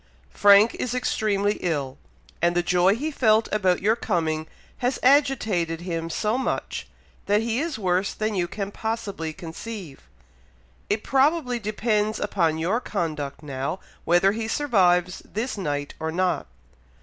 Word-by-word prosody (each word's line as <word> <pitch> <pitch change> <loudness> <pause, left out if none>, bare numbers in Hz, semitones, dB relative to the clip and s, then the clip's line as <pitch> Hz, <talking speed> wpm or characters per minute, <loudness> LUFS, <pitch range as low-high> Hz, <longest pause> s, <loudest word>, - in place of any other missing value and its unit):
Frank 205 +2 +6
is 250 0 -2
extremely 210 -4 0
ill; 145 -7 -2 0.4
and 170 +1 +2
the 175 - +2
joy 180 +3 +3
he 300 +7 -3
felt 220 -5 +3
about 185 -4 +1
your 220 +3 +4
coming, 160 -8 -1 0.3
has 250 +1 0
agitated 225 - +2
him 165 -2 -3
so 215 +7 0
much, 265 - -3 0.4
that 205 +2 +3
he 230 +1 0
is 315 -3 -2
worse 185 -1 0
than 215 0 -1
you 180 -3 0
can 200 +2 -5
possibly 205 -8 -3
conceive. 170 0 -8 0.8
It 210 +1 0
probably 270 -2 +2
depends 215 0 0
upon 170 -6 +1
your 180 +9 0
conduct 155 - -3
now, 140 +5 -3 0.2
whether 175 +3 +4
he 220 +1 -3
survives 185 -9 +2
this 230 +5 -4
night 145 -7 -3
or 160 0 -2
not. 180 +2 0
200 Hz, 140 wpm, -24 LUFS, 170-225 Hz, 0.8 s, Frank